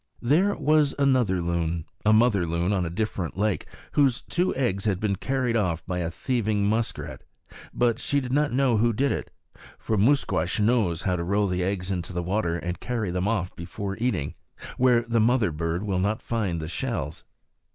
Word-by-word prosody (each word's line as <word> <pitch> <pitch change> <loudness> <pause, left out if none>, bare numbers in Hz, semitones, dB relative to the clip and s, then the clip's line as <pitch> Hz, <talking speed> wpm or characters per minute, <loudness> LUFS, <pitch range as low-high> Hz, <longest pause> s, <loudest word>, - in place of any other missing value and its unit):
There 170 +11 +3
was 150 -1 +2
another 125 -10 +2
loon, 85 -1 -1 0.2
a 105 - +4
mother 110 -5 +4
bird, 85 +3 0
on 95 -3 +1
a 85 - -2
different 95 -2 -3
lake, 105 -1 0 0.2
whose 135 -4 +2
two 180 +2 0
eggs 115 -7 0
had 100 -4 +1
been 100 -2 0
carried 130 +3 -1
off 90 -7 0
by 90 -1 -2
a 85 -2 -1
thieving 110 0 -1
muskrat; 110 +2 -2 0.5
but 120 -2 +1
she 145 - +1
did 130 -2 -4
not 150 +1 +2
know 125 -2 +2
who 115 +2 +2
did 135 +6 +1
it, - - -3 0.5
for 110 - -2
Musquash 100 - +2
knows 105 -7 +2
how 90 -2 +1
to 85 - -2
roll 100 +4 +1
the 90 -1 -1
eggs 95 0 -2
into 90 -1 -3
water 90 -1 -1
and 90 +1 -4
carry 115 -7 -2
them 90 +2 -1
off, 95 -5 -1
before 100 +3 -5
eating, 105 - -1 0.4
where 125 -2 +4
the 115 0 0
mother 115 -4 +3
bird 85 +4 -2
will 95 -3 -1
not 105 +4 0
find 105 -8 -1
the 80 - -5
shells. 85 - -3
105 Hz, 185 wpm, -26 LUFS, 90-120 Hz, 0.5 s, a